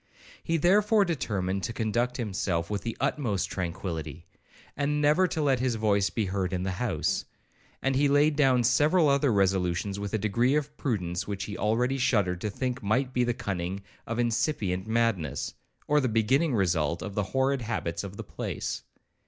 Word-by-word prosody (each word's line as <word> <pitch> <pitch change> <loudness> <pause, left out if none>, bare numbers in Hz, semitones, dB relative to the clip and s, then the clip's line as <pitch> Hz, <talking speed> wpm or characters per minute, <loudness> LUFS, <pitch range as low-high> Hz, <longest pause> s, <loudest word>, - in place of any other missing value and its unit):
He 165 - +1
therefore 205 +5 +4
determined 100 - -1
to 115 - -3
conduct 120 +2 -1
himself 95 -6 -2
with 100 -2 -1
the 115 +2 -4
utmost 120 -7 -1
tranquillity, 85 -3 -4 0.5
and 145 +1 0
never 150 +5 +4
to 160 -2 -2
let 135 -3 +2
his 125 -2 0
voice 100 -3 +2
be 110 - -1
heard 95 -1 -2
in 90 0 -1
the 95 - -1
house; 120 -5 0 0.6
and 135 0 +1
he 145 +2 +3
laid 145 +2 +4
down 130 -4 +4
several 150 +7 +4
other 140 -1 +3
resolutions 95 -1 +1
with 100 -1 -4
a - - +3
degree 115 +6 +1
of 150 0 -2
prudence 90 -12 -2
which 100 -1 -3
he 105 +1 -5
already 125 +5 +1
shuddered 100 -8 +1
to 105 - -1
think 125 +4 -3
might 125 +5 0
be 125 - +2
the 120 -1 0
cunning 95 0 -3 0.2
of 115 - -3
incipient 110 - 0
madness, 110 -8 0 0.3
or 150 0 +4
the 130 -3 0
beginning 125 +7 +2
result 85 -5 +1
of 105 - -5
the 105 0 -1
horrid 135 0 +2
habits 110 -7 -3
of 100 0 -8
the - - -5
place. - - -4
115 Hz, 175 wpm, -28 LUFS, 95-135 Hz, 0.6 s, therefore